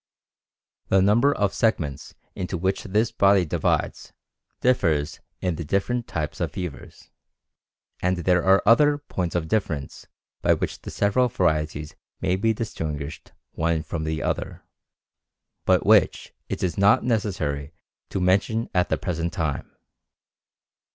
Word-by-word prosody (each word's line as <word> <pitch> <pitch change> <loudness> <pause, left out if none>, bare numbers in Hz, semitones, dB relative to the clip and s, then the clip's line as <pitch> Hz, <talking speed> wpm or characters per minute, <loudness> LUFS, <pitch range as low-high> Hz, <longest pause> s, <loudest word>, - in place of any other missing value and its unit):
The 95 - +4
number 105 +9 +4
of 100 -7 0
segments 80 -12 -1 0.2
into 90 0 -4
which 95 +3 -1
this 105 +4 +1
body 100 -2 +4
divides 75 - -1 0.5
differs 80 -12 +1 0.2
in 90 -3 -1
the 85 - -4
different 105 +9 -1
types 75 -3 -4
of - - -2
fever, 90 -6 -6 1.1
and 90 0 +1
there 90 0 +2
are 95 +1 +4
other 145 +7 +5
points 90 - -4
of 85 -2 -1
difference 80 -9 -2 0.3
by - - +4
which - - -4
the - - -7
several 105 +5 +2
varieties 75 -7 -1 0.3
may 90 - +1
be 110 +4 +1
distinguished 80 - -5 0.2
one 80 -1 0
from 80 0 -4
the 80 0 -2
other, - - -3 1.0
but - - +3
which - - +3 0.2
it - - -3
is 90 0 -1
not 100 +2 +5
necessary 85 - -1 0.4
to - - -2
mention 100 +5 +1
at 90 0 +2
the - - +1
present 85 -2 -2
time. 80 -6 -3
90 Hz, 135 wpm, -24 LUFS, 80-105 Hz, 1.1 s, other